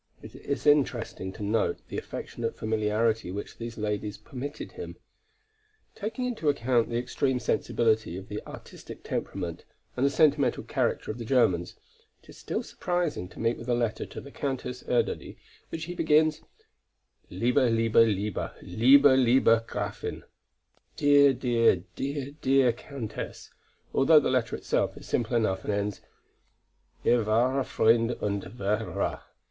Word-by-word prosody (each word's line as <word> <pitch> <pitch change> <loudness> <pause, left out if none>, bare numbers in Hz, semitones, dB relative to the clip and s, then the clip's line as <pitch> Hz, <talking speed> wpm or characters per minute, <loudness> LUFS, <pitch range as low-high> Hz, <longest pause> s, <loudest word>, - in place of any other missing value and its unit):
It - - -10
is 140 - -4
interesting 130 -9 +1
to 105 - -7
note 105 +2 +1
the - - -3
affectionate 115 -1 -5
familiarity 110 -1 0
which 100 +3 -7
these 115 0 -6
ladies 105 -1 -3
permitted 130 +7 -7
him. - - -8 1.0
Taking 225 +4 -4
into 225 -11 -1
account 120 -4 +1
the 115 - -1
extreme 125 +2 0
sensibility 110 -6 0
of 95 - -9
the 105 0 -5
artistic - - -11
temperament - - -4 0.3
and 125 - -1
the 140 - +5
sentimental 140 -2 +2
character - - -1
of 110 - -8
the - - -4
Germans, 110 -8 +2 0.5
it - - -22
is - - -13
still - - -3
surprising 175 - -2
to - - -13
meet 115 +1 +1
with 115 - -8
a 120 - +3
letter 120 -2 -1
to - - -8
the 140 - -11
Countess 130 -3 -4
Erdödy, 120 - -1 0.3
which 160 - -5
he 175 - -5
begins: 155 -2 +3 0.9
"Liebe, 125 +2 +2
liebe, 115 -1 +1
liebe, 105 -3 +2
liebe, 130 +10 +5
liebe 120 -3 +4
Gräfin" - - -4 0.7
("Dear, 145 -1 +6
dear, 120 -4 +3 0.2
dear, 140 0 -3
dear, 140 - -9
dear 130 -2 +4
Countess"), 120 -3 -7 0.4
although 150 +3 +6
the - - 0
letter 125 -3 0
itself - - -1
is - - -11
simple 120 +1 0
enough 95 -4 0
and - - -2
ends: 100 0 -2 1.0
"Ihr 120 -1 +3
wahrer 125 +5 +2
Freund 115 0 +3
und 100 -1 -1
Verehrer." 105 +2 -2
120 Hz, 145 wpm, -28 LUFS, 110-140 Hz, 1.0 s, Dear